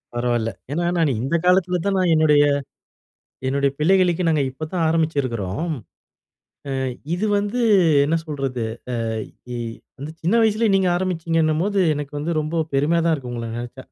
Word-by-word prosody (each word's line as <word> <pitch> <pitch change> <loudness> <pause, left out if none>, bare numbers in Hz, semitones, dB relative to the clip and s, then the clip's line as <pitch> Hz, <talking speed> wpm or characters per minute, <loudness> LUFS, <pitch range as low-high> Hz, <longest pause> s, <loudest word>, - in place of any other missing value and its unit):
பரவாயில்ல. 120 -2 0 0.2
ஏனா 170 +4 -1
நான் 160 -4 +2
இந்த 135 +7 -1
காலத்தில 180 -1 +3
தான் 200 -1 +1
நான் 185 -2 +2
என்னுடைய, 150 -2 +5 1.0
என்னுடைய 140 +1 +1
பிள்ளைகளுக்கே 180 +1 +3
நாங்க 150 -3 +2
இப்ப 155 +4 -6
தான் 170 -3 +1
ஆரம்பிச்சுருக்கிறோம். 145 - -1 1.0
ஆ - - -2 0.4
இது 200 +5 -1
வந்து 205 +5 -2 0.4
என்ன 160 +3 +1
சொல்றது? 135 -5 -3 0.4
ஆ - - -1 0.5
இ - - -4 0.4
வந்து 150 +3 -7
சின்ன 175 +7 +1
வயசிலே 220 +1 +2
நீங்க 190 -1 +3
ஆரம்பிச்சிங்கன்னும்போது 165 +1 0
எனக்கு 145 0 -5
வந்து 160 +4 -2
ரொம்ப 160 +2 -1
பெருமையா 155 +5 +2
தான் 165 - +3
இருக்கு 125 -4 -7
உங்கள 115 -1 -4
நெனச்சா. 120 +2 -7
160 Hz, 145 wpm, -22 LUFS, 140-180 Hz, 1.0 s, என்னுடைய